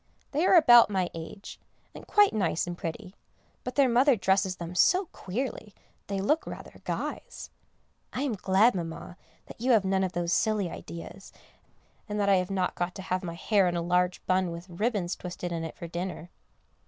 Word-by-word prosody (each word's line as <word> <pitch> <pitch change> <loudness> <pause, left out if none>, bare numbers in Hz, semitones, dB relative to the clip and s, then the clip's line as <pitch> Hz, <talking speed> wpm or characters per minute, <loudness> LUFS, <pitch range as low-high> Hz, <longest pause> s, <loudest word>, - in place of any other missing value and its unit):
They 310 +6 +1
are - - +6
about 240 - +8
my 190 -3 -1
age, 165 +5 -9 0.3
and - - -11
quite 415 -1 +4
nice 185 -6 0
and 175 0 -5
pretty; 180 +3 -6 0.5
but 250 - -5
their 280 -2 +5
mother 255 +3 +4
dresses 190 -2 +1
them 170 -1 -7
so 370 - +4
queerly, 220 0 -5 0.3
they 195 -1 -2
look 300 +12 +1
rather - - -9
guys. - - -5 0.6
I 260 - -3
am 275 -5 -1
glad, 200 +4 +3
Mamma, 170 0 -6 0.3
that - - -13
you 255 +1 +3
have 210 -4 +3
none 190 0 +1
of 185 -1 -2
those 170 0 -1
silly 210 -5 +1
ideas, 175 +3 -9 0.8
and 210 0 -2
that 200 -1 +2
I 195 - +5
have 180 0 -1
not 190 -2 -1
got 175 +1 -3
to 190 - -7
have 185 0 -2
my 170 -1 -5
hair 195 +1 +2
in 175 - -1
a 170 - 0
large 180 +1 0
bun 185 -1 +1
with 170 +2 -8
ribbons 195 -1 -1
twisted 175 0 -6
in 165 -1 -3
it 160 - -6
for 170 - -7
dinner. 175 0 -5
190 Hz, 190 wpm, -28 LUFS, 175-220 Hz, 0.8 s, about